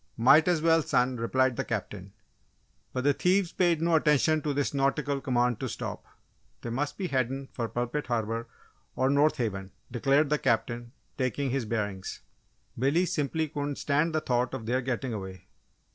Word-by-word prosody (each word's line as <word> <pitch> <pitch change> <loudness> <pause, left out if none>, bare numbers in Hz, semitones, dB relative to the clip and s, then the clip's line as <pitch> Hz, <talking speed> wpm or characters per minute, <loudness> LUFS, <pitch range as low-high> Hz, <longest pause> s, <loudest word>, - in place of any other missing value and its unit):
"Might 140 +8 +6
as 170 -3 +2
well, 165 0 +5
son," 125 -3 +1
replied 130 +2 +1
the - - 0
Captain. 100 -3 -5 0.8
But 130 - -2
the 145 +1 +4
thieves 180 +3 +2
paid 170 -3 +2
no 170 0 +2
attention 155 +1 +3
to 150 - -1
this 145 0 -1
nautical 140 0 0
command 125 -3 +1
to - - -3
stop. - - -5 0.6
"They 120 - -4
must 145 +4 -2
be 185 -3 -3
headin' 135 +1 -1
fer 115 -2 -3
Pulpit 120 +6 -3
Harbour, 115 -1 -2 0.5
on 130 +2 +2
North 145 +2 +3
Haven," 100 -5 -3 0.2
declared 135 +4 +2
the 150 - +2
Captain, 120 +1 -1 0.3
taking 130 +1 -1
his 135 -3 -1
bearings. 105 -4 -3 0.6
Billy 145 +8 +3
simply 160 -2 -1
couldn't 145 0 -3
stand 155 +4 0
the 155 - +1
thought 125 -2 0
of 110 - -6
their 125 +3 0
getting 125 0 -2
away. 95 -3 -7
135 Hz, 170 wpm, -28 LUFS, 120-150 Hz, 0.8 s, Might